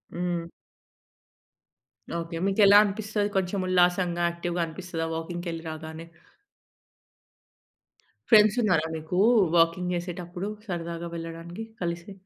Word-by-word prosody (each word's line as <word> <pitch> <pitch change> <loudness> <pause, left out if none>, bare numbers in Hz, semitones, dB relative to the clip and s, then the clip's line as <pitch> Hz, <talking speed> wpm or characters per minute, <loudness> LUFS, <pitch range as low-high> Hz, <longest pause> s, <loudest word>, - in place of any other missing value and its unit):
హ్మ్. 175 -1 -2 1.7
ఓకే. 165 0 -5
మీకు 195 +2 +2
ఎలా 200 +1 +8
అనిపిస్తది? 210 0 -1
కొంచెం 190 +1 0
ఉల్లాసంగా, 180 -1 +2
యాక్టివ్‌గా 170 0 -3
అనిపిస్తదా 165 0 -5
వాకింగ్‌కెళ్లి 165 0 -5
రాగానే? 160 +1 -7 2.2
ఫ్రెండ్స్ 215 0 +6
ఉన్నారా 180 -7 +2
మీకు 160 +3 -4 0.4
వాకింగ్ 170 +2 +2
చేసేటప్పుడు 175 +2 -5 0.2
సరదాగా 170 -1 -4
వెళ్ళడానికి 165 +4 -7 0.2
కలిసి? 170 +2 -4
175 Hz, 95 wpm, -27 LUFS, 165-185 Hz, 2.2 s, ఎలా